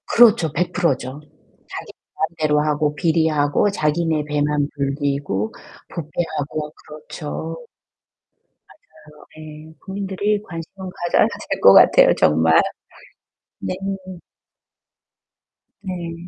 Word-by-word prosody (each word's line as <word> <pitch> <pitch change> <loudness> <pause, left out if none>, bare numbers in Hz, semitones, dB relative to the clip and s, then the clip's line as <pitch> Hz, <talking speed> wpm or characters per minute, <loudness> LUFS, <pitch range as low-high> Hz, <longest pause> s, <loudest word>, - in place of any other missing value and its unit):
그렇죠. 220 -9 +5
100% 175 -3 +1
죠. 130 +3 -8 0.5
자기 - - -7 0.2
마음대로 155 -2 0
하고 150 0 0
비리하고 160 +1 +2
자기네 155 -2 0
배만 150 0 0
불리고 140 -6 -2 0.4
부패하고 155 -2 -4 0.2
그렇죠. 155 +4 -7 1.0
맞아요. 150 - -19 0.3
예. 155 +1 -13
국민들이 200 +1 -2
관심을 185 +2 -8 0.2
가져야 175 - +4 0.2
될 - - -2
것 - - +8
같아요, - - +7
정말. 80 +1 +4 1.0
네. - - -3 2.1
네. 175 -2 -6
155 Hz, 200 characters per minute, -21 LUFS, 150-175 Hz, 2.1 s, 것